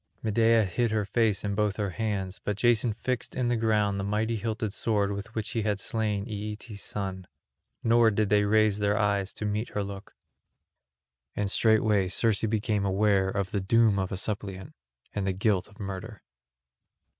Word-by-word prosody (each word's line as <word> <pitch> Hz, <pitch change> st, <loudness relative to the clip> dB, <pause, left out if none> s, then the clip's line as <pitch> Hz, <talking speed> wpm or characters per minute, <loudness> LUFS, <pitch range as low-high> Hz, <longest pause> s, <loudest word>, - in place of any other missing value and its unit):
Medea 115 Hz, 0 st, +3 dB
hid 115 Hz, +6 st, 0 dB
her 110 Hz, -1 st, 0 dB
face 110 Hz, -1 st, +1 dB
in 100 Hz, -1 st, -1 dB
both 105 Hz, -1 st, 0 dB
her 100 Hz, -3 st, -2 dB
hands, 95 Hz, -2 st, -3 dB
but 105 Hz, -1 st, -2 dB
Jason 120 Hz, +1 st, +3 dB
fixed 120 Hz, +3 st, -3 dB
in 125 Hz, -2 st, 0 dB
the 120 Hz, -, +2 dB
ground 105 Hz, -3 st, +1 dB
the -, -, -2 dB
mighty 110 Hz, +3 st, 0 dB
hilted 110 Hz, -1 st, -3 dB
sword 105 Hz, -3 st, +1 dB
with 100 Hz, +2 st, -6 dB
which 110 Hz, -1 st, -3 dB
he 115 Hz, -, -1 dB
had 105 Hz, -2 st, -1 dB
slain 105 Hz, -2 st, -1 dB
Aeetes' 105 Hz, 0 st, -6 dB
son; 95 Hz, -2 st, -5 dB, 0.6 s
nor 115 Hz, 0 st, +5 dB
did 105 Hz, -1 st, 0 dB
they 105 Hz, -1 st, +4 dB
raise 105 Hz, 0 st, +3 dB
their 105 Hz, 0 st, +1 dB
eyes 100 Hz, -2 st, +1 dB
to 110 Hz, -, -5 dB
meet 105 Hz, +2 st, -2 dB
her 105 Hz, -, -2 dB
look. 100 Hz, +1 st, -8 dB, 1.2 s
And 100 Hz, -1 st, -1 dB
straightway 105 Hz, -4 st, +3 dB
Circe 110 Hz, +2 st, +1 dB
became 110 Hz, -2 st, 0 dB
aware 100 Hz, 0 st, +2 dB
of 100 Hz, -1 st, -2 dB
the 100 Hz, -, -1 dB
doom 110 Hz, +1 st, +3 dB
of 95 Hz, -1 st, -2 dB
a 95 Hz, -, -2 dB
suppliant 100 Hz, -2 st, -4 dB, 0.4 s
and 100 Hz, -2 st, -2 dB
the 95 Hz, -, +1 dB
guilt 95 Hz, 0 st, +1 dB
of 105 Hz, -, -20 dB
murder. 100 Hz, +2 st, -6 dB
105 Hz, 180 wpm, -28 LUFS, 100-110 Hz, 1.2 s, nor